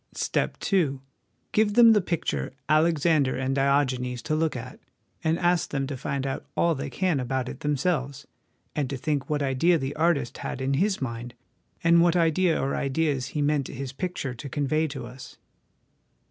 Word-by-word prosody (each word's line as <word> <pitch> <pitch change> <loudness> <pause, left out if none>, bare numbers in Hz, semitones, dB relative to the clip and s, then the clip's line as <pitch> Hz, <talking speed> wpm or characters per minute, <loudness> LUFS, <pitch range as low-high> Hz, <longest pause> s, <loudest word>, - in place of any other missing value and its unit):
" - - -31
Step - - -1 0.2
II. 150 -8 +2 0.5
Give 210 -1 +2
them 230 -2 +8
the 210 - +4
picture 160 - -2
' - - -45
Alexander 155 -3 +2
and 130 +1 -1
Diogenes' 135 -3 +1
to - - -2
look 160 -1 0
at, 120 - -7 0.4
and 160 +1 +2
ask 175 -1 +1
them 135 -1 -1
to 140 0 -4
find 135 +1 -3
out 135 - -3
all 170 -1 +3
they 140 -1 -4
can 175 +1 0
about 130 0 -2
it - - -7
themselves, 140 -2 -1 0.5
and 145 -4 -1
to 135 - -3
think 140 0 -2
what 150 -1 0
idea 140 +6 +3
the 135 -1 -4
artist 155 -6 +1
had - - -4
in 135 +1 0
his 190 +2 +1
mind, 120 0 -5 0.5
and 170 0 +6
what 175 0 +4
idea 170 0 +2
or 135 - -1
ideas 140 -1 0
he 145 - +2
meant 145 -2 +1
his 135 -1 -6
picture 160 -4 -3
to 135 +4 -8
convey 150 +3 0
to 135 -4 -6
us. 125 +1 -11
140 Hz, 185 wpm, -26 LUFS, 130-165 Hz, 0.5 s, them